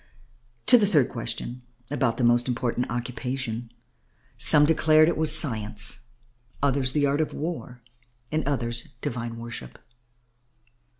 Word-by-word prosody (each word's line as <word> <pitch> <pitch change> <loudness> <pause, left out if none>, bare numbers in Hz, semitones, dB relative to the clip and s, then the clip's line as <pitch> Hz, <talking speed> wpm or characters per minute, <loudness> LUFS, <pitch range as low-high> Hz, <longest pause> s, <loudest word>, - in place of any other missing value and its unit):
To 245 - +7
the 205 - +2
third 150 -10 +2
question 120 +1 -5 0.3
about 130 -5 0
the 130 - -1
most 120 +1 +3
important 125 0 -2
occupation, 120 -1 -4 0.6
some 150 -1 +5
declared 155 0 +4
it 170 - +1
was 155 0 +6
science, 110 -3 -1 0.5
others, 135 -2 +1
the 145 -1 +2
art 140 +2 +1
of 155 - -3
war, 145 -6 -6 0.5
and 155 +1 -1
others, 120 -4 -2
divine 115 -1 -4
worship. 115 - -9
125 Hz, 125 wpm, -25 LUFS, 120-150 Hz, 0.6 s, To